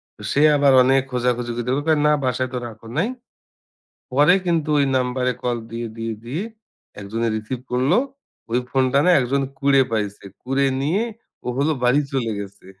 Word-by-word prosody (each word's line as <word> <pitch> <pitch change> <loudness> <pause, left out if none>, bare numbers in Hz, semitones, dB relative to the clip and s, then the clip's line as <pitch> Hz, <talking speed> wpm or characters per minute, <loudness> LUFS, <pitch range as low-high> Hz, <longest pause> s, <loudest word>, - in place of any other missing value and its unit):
ত - - -83
সে 145 - +2 0.2
আবার 140 -1 +4
অনেক 135 +1 +4
খোঁজাখুজি 125 -1 -1 0.2
করে 135 +3 0
কয়, 155 -2 +3
"না 150 - +5
বাসায় 130 0 -1
তো - - -1
রাখো 115 0 -12
নাই।" 175 +7 +2 1.1
পরে 145 +7 +5
কিন্তু 165 -3 0
ঐ - - +4 0.2
নাম্বারে 125 0 0
কল 120 -1 0 0.2
দিয়ে, 115 0 -4
দিয়ে, 115 0 -3
দিয়ে, 145 +10 -3 0.6
একজনে 115 +4 -2
রিসিভ 110 +4 -4
করলো। 130 - +2 0.5
ওই 120 - +2
ফোনটা 130 0 +2
না - - +6
একজন 135 +2 0 0.2
কুড়ে 140 -1 +4
পাইছে। 105 -2 -2 0.2
কুড়ে 135 +2 +1 0.2
নিয়ে 170 +10 +1 0.4
ও - - -1
হলো 145 +4 +2
বাড়ি 125 +4 +4
চলে 120 -4 -1
গেছে। 100 -1 -9
130 Hz, 170 wpm, -21 LUFS, 120-140 Hz, 1.1 s, না